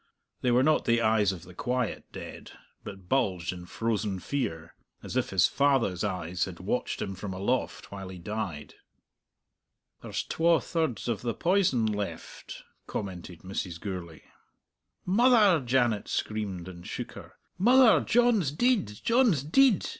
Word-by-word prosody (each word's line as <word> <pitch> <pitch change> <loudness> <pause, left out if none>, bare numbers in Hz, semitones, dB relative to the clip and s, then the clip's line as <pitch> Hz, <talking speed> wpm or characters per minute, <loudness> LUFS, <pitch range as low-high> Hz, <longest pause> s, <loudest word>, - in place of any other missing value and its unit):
They 125 - +1
were 125 +2 +4
not 155 +1 +3
the 115 0 +3
eyes 110 -3 +3
of 90 -4 -8
the 90 - -13
quiet 125 +4 -2
dead, - - -9 0.3
but 95 -2 -10
bulged 95 -9 0
in 90 -1 -10
frozen 105 -3 -2
fear, 85 - -4 0.3
as - - -7
if - - 0
his 95 -2 +4
father's 135 -11 +2
eyes 90 -3 -2
had - - -9
watched - - -2
him 95 - -4
from 95 0 -6
aloft 110 +7 -2
while 95 -2 -7
he 95 - -8
died. 95 -5 -5 1.3
"There's - - -3
twa 165 0 +2
thirds 160 - -2
of 115 -4 -1
the 115 -3 -2
poison 175 - +2
left," 105 -2 -5 0.2
commented 90 -4 -6
Mrs. 90 -2 -5
Gourlay. 90 -5 -6 0.8
"Mother!" 205 - +5
Janet 120 -4 +1
screamed, 100 -5 -3
and 85 -1 -10
shook - - -5
her. - - -12 0.3
"Mother, 245 +3 +6
John's 235 - +3
deid! 240 - +2 0.2
John's 230 - +3
deid! 235 - +4
110 Hz, 145 wpm, -28 LUFS, 95-150 Hz, 1.3 s, Mother